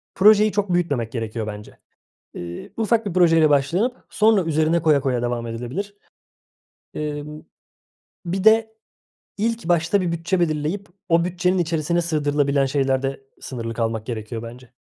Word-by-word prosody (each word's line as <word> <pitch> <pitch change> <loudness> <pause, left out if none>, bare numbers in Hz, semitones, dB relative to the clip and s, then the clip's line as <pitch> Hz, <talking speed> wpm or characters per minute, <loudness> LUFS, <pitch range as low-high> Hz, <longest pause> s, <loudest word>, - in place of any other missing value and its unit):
projeyi 210 +2 +6
çok 200 -3 -1
büyütmemek 140 -10 0
gerekiyor 115 -2 -4
bence. 105 0 -9 0.6
Eee, 85 - -8
ufak 225 0 +1
bir 200 - -2
projeyle 165 -4 +5
başlanıp 175 - +1
sonra 215 -4 +3
üzerine 160 +1 +1
koya 150 -3 +4
koya 130 -3 -1
devam 120 -1 -2
edilebilir. 125 - -5 1.0
Emm, 150 0 -5 0.8
bir 185 +2 -2
de 220 0 +4 0.6
ilk 230 -3 -1
başta 175 +3 +2
bir 175 -2 -1
bütçe 170 +2 -1
belirleyip 160 +4 -1 0.2
o 170 -1 +3
bütçenin 180 +1 0
içerisine 170 0 0
sığdırılabilen 145 -3 +1
şeylerde 135 0 0 0.2
sınırlı 115 -3 -5
kalmak 115 -1 -2
gerekiyor 115 -1 -5
bence. 120 +1 -11
155 Hz, 135 wpm, -22 LUFS, 130-185 Hz, 1.0 s, projeyi